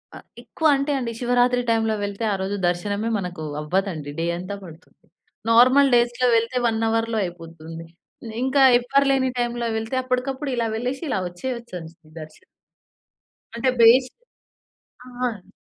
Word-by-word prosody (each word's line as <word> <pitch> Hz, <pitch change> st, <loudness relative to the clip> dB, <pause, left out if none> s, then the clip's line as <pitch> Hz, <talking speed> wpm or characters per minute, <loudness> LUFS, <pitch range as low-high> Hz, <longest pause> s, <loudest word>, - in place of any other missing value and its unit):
ఆ! -, -, -8 dB, 0.2 s
ఎక్కువ 320 Hz, -, -1 dB
అంటే 275 Hz, +2 st, -1 dB
అండి, 235 Hz, -2 st, -3 dB
శివరాత్రి 245 Hz, 0 st, +2 dB
టైమ్‌లో 225 Hz, -1 st, +1 dB
వెళ్తే 200 Hz, +2 st, -4 dB
ఆరోజు 195 Hz, +1 st, -2 dB
దర్శనమే 200 Hz, +5 st, -1 dB
మనకు 180 Hz, -4 st, -5 dB, 0.2 s
అవ్వదండి, 160 Hz, -2 st, -2 dB
డే 165 Hz, -, 0 dB
అంతా 185 Hz, +3 st, -6 dB
పడుతుంది. 165 Hz, 0 st, -14 dB, 0.5 s
నార్మల్ 255 Hz, +4 st, +6 dB
డేస్‌లో 240 Hz, +1 st, +2 dB
వెళ్తే 230 Hz, +3 st, -1 dB
1 225 Hz, 0 st, -1 dB
అవర్‌ 225 Hz, 0 st, 0 dB
అయిపోతుంది. 165 Hz, -2 st, -8 dB, 0.6 s
ఇంకా 270 Hz, +1 st, +3 dB, 0.2 s
ఎవ్వరు 275 Hz, +3 st, +2 dB
లేని 260 Hz, -1 st, +2 dB
టైమ్‌లో 240 Hz, -1 st, -1 dB
వెళ్తే, 225 Hz, +4 st, -4 dB
అప్పటికప్పుడు 260 Hz, +2 st, -2 dB
ఇలా 230 Hz, -1 st, 0 dB
వెళ్ళేసి 250 Hz, +6 st, -3 dB
ఇలా -, -, 0 dB
వచ్చేయొచ్చు 235 Hz, 0 st, -6 dB, 0.4 s
దర్శనం. 155 Hz, 0 st, -13 dB, 1.1 s
అంటే 245 Hz, +3 st, +1 dB
బేస్ 250 Hz, +3 st, +6 dB, 1.0 s
ఆ! -, -, -11 dB, 0.2 s
అండి. 200 Hz, -4 st, -13 dB
230 Hz, 135 wpm, -23 LUFS, 185-255 Hz, 1.1 s, నార్మల్